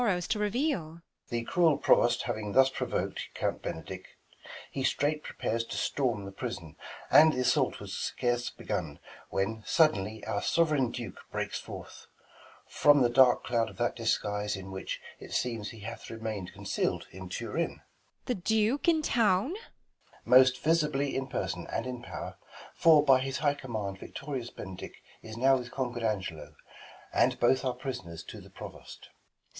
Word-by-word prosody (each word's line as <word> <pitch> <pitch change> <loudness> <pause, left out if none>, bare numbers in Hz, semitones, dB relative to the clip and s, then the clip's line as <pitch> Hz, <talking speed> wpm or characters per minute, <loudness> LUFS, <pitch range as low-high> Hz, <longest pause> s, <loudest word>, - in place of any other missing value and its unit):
The 120 -1 -2
cruel 165 -3 +3
Provost 120 +1 +4
having 110 -4 -3
thus 135 0 +6
provok'd - - -2 0.2
Count - - -1
Benedick; 80 - -7 0.5
he 135 - -3
straight 150 +3 +1
prepares 115 -5 -2
to - - -5
storm 120 -8 0
The 100 - -7
prison; 95 - -6 0.4
and, 155 0 +8
th' - - -4
assault 125 -1 +2
was - - -7
scarce 120 0 -1
begun - - -4 0.3
When, 110 +3 -1
suddenly 110 - +2
our 100 - -1
sov'reign 150 -7 +2
Duke 115 -6 -6
breaks - - -2
forth - - -10 0.6
From 145 -2 +5
the 120 - +3
dark 125 0 +6
cloud 115 -2 +1
of - - -14
that 120 0 0
disguise, 105 -3 0
in 95 0 -8
which. 95 0 -4 0.2
It - - -9
seems, 115 -4 -1
he 115 - -11
hath 115 +3 -7
i - - -6
emain'd 110 -5 -4
conceal'd - - -2
in 95 +1 -9
Turin. 120 - -2
Beat. - - -30
The 250 - 0
Duke 220 - +2
in 320 -2 +4
town 215 -3 +3
1 - - -3
Balt. 410 - -6 0.7
Most 130 0 +6
visibly 150 -3 +2
in 135 0 -1
person, 130 - -3
and 115 - -2
in 125 -1 -5
pow'r. - - -7 0.4
For 155 -3 +6
by 135 -2 +6
his 135 +1 -2
high 145 -1 +2
command 110 -8 -5
victorious 135 -4 -5
Benedick 95 -2 -8 0.3
Is 110 0 -9
now 135 +2 +5
with 125 -1 -6
conquer'd 125 -3 -3
Angelo, 95 -8 -3 0.6
and - - +3
both 130 +2 +3
Are 130 -2 -1
pris'ners 90 - -6
to - - -9
the - - -14
Provost. - - -10
Beat. - - -14
125 Hz, 160 wpm, -30 LUFS, 110-140 Hz, 0.7 s, and